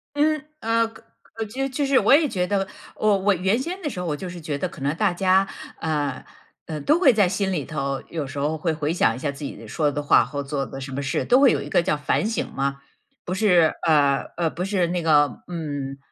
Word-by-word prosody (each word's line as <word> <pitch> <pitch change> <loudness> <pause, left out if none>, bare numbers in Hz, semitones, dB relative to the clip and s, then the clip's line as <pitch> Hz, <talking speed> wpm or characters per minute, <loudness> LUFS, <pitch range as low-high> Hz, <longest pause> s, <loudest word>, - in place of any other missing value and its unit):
嗯 305 0 +2 0.2
呃， 230 -1 +1
可 225 - -16 0.2
可 225 - -6
就 260 +6 -3
就 275 +2 -1
是 270 -1 +3
我 260 - +5
也 300 +2 +5
觉 180 -5 0
得， 195 0 0 0.3
哦， 210 -2 +3
我 200 +1 +2
原 190 +4 +1
先 345 +9 -4
的 305 - -2
时 185 - -6
候 180 - -3
我 155 -3 -1
就 180 +5 -6
是 175 0 -8
觉 155 -3 -3
得 180 +5 -2
可 170 - -13
能 140 +3 0
大 200 +2 +2
家， 190 +2 +3 0.3
呃， 145 -4 -2 0.4
呃 155 -2 -4
都 305 - +3
会 290 -8 +6
在 205 -4 +4
心 190 +1 -1
里 155 -7 -2
头， 140 -3 -3
有 160 -3 -3
时 140 +2 -8
候 145 +3 0
会 165 +2 -1
回 155 0 -1
想 115 -10 +2
一 - - -8
下 145 +1 -2
自 140 +1 -10
己 140 - -5
的 115 - -11
说 150 +5 0
的 145 - -3
话 145 - +5
或 140 +4 -5
做 140 -1 -2
的 135 - -8
什 135 0 -7
么 135 +2 -3
事， 135 - -1
都 250 +1 +5
会 275 -2 +6
有 145 - 0
一 145 - -7
个 175 - +3
叫 150 -3 0
反 145 +7 0
省 225 - -2
嘛。 140 0 -2 0.5
不 180 - -3
是 180 -5 +4
呃， 145 -3 +4 0.2
呃， 170 -2 +1
不 175 - -4
是 190 -3 +1
那 175 +1 -1
个， 145 -4 +3
嗯： 145 -5 -4
170 Hz, 270 characters per minute, -23 LUFS, 145-205 Hz, 0.5 s, 会